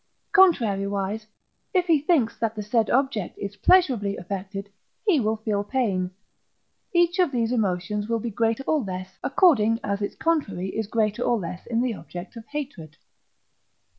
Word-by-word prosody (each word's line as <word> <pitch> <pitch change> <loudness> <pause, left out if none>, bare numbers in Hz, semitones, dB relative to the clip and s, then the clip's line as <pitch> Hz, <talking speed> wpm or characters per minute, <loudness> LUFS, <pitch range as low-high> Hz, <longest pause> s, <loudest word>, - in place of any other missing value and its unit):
Contrariwise, 210 - +3 0.5
if 365 -1 +4
he 330 -4 +4
thinks 290 -7 +2
that 225 -1 -1
the 210 - -4
said 220 +1 +1
object 255 -7 0
is 200 0 -6
pleasurably 240 - +3
affected, 195 +2 -5 0.4
he 375 -9 +4
will 220 -2 +1
feel 215 -2 -1
pain. 205 -6 0 0.8
Each 345 +1 +2
of 360 -6 +3
these 235 -3 0
emotions 205 -1 -1
will 230 - +2
be 230 +1 -4
greater 225 +4 0
or 310 +2 +1
less, 185 -2 -6
according 230 - +4
as 200 0 -2
its 205 - -3
contrary 200 - -1
is 220 +1 -3
greater 215 0 0
or 240 -1 +2
less 180 -2 -6
in 235 0 +1
the 250 -2 0
object 180 -1 -9
of 230 -1 -10
hatred. 265 - -6
220 Hz, 160 wpm, -25 LUFS, 200-265 Hz, 0.8 s, if